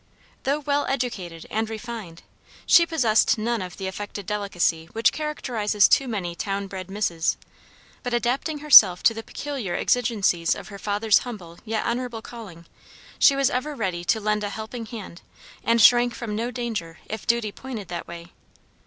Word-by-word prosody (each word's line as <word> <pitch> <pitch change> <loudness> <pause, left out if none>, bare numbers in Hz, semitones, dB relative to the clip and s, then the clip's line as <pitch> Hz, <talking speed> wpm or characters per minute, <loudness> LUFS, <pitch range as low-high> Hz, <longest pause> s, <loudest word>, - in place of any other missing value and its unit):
Though 280 +2 +2
well 290 -1 -1
educated 200 -11 -3
and 220 0 -1
refined, 220 -6 -7 0.4
she 340 -1 +6
possessed 240 -12 +3
none 230 0 -1
of 180 -2 -7
the 190 - -5
affected 205 +1 -6
delicacy 180 -6 -1
which 225 0 +3
characterizes 230 -10 +1
too 270 - +3
many 195 -7 -3
town 195 +3 -3
bred 190 -1 -7
misses, 185 -5 -1 0.6
but, 245 - -4
adapting 245 +6 0
herself 205 -12 +8
to 225 - +5
the 225 - -6
peculiar 260 -7 -5
exigencies 210 -9 +1
of - - -9
her 200 -1 -9
father's 210 +1 +2
humble 180 -9 -9
yet 220 -1 -2
honorable 235 -2 -3
calling, 195 -8 -10 0.5
she 275 - +6
was 275 -1 +2
ever 285 +4 -2
ready 185 -7 -2
to 220 - +2
lend 210 0 0
a 205 - -2
helping 220 +2 -6
hand, 210 -6 -9 0.4
and 230 0 +3
shrank 240 -1 +6
from 220 -4 -5
no 230 +3 -2
danger 225 -9 -4
if 220 -1 -7
duty 235 -3 +1
pointed 235 -4 -7
that 175 - -5
way. 170 0 -10
220 Hz, 165 wpm, -24 LUFS, 190-245 Hz, 0.6 s, herself